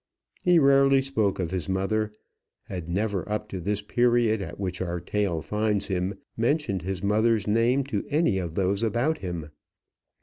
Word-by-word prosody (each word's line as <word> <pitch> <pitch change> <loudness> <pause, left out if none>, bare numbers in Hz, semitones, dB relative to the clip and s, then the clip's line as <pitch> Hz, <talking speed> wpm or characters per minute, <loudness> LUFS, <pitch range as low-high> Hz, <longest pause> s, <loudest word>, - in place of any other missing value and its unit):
He 180 -1 +5
rarely 135 -2 +5
spoke 110 -7 0
of 90 -3 -2
his 90 -4 -3
mother, 105 +3 0 0.5
had 90 -3 -6
never, 100 +1 -1
up 105 0 -2
to 95 - -5
this 100 +3 -2
period 120 -1 +2
at 95 - -7
which 95 -2 -3
our 90 -1 -2
tale 90 -3 -1
finds 105 -1 -1
him, 95 +1 -1 0.2
mentioned 120 - 0
his 95 +1 -4
mother's 110 +1 +2
name 115 +6 +2
to 125 -7 -3
any 145 - +2
of 85 -3 -5
those 100 +1 +1
about 120 +8 +1
him. 85 -5 -5
105 Hz, 165 wpm, -26 LUFS, 95-115 Hz, 0.5 s, He